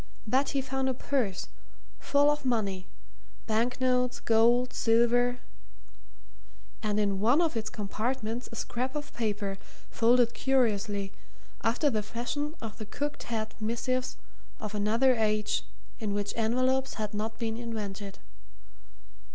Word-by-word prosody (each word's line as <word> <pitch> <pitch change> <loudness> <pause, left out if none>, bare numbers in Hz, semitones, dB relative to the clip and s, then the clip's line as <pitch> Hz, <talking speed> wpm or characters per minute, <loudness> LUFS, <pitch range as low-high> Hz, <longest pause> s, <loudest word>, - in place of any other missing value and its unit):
But 260 +6 +2
he - - +3
found 265 0 -1
a 260 - 0
purse, 240 -8 -1 0.5
full 285 +1 +4
of 295 0 -2
money 200 -7 0 0.6
banknotes, 250 +2 +1
gold, 235 +2 +4
silver 240 +2 +3 1.4
and 210 -1 0
in 200 -2 +1
one 240 +9 +4
of 330 -6 +2
its 225 -1 -2
compartments 225 +3 -3
a - - -7
scrap 255 +4 -3
of 295 0 -5
paper 205 -3 -2 0.3
folded 235 0 +4
curiously, 210 -7 +1 0.5
after 260 +6 +2
the 215 -2 +1
fashion 245 +8 -3
of 225 0 -6
the 215 - -5
cocked 290 +7 -4
hat 220 -2 -2
missives 250 +3 -1 0.4
of 215 -1 -5
another 225 +5 +3
age 215 -2 +1 0.3
in 210 -3 -2
which 205 0 -1
envelopes 255 +4 +1
had 215 -1 -3
not 215 +2 -3
been 225 -2 -2
invented. 210 -4 -5
230 Hz, 125 wpm, -29 LUFS, 215-255 Hz, 1.4 s, full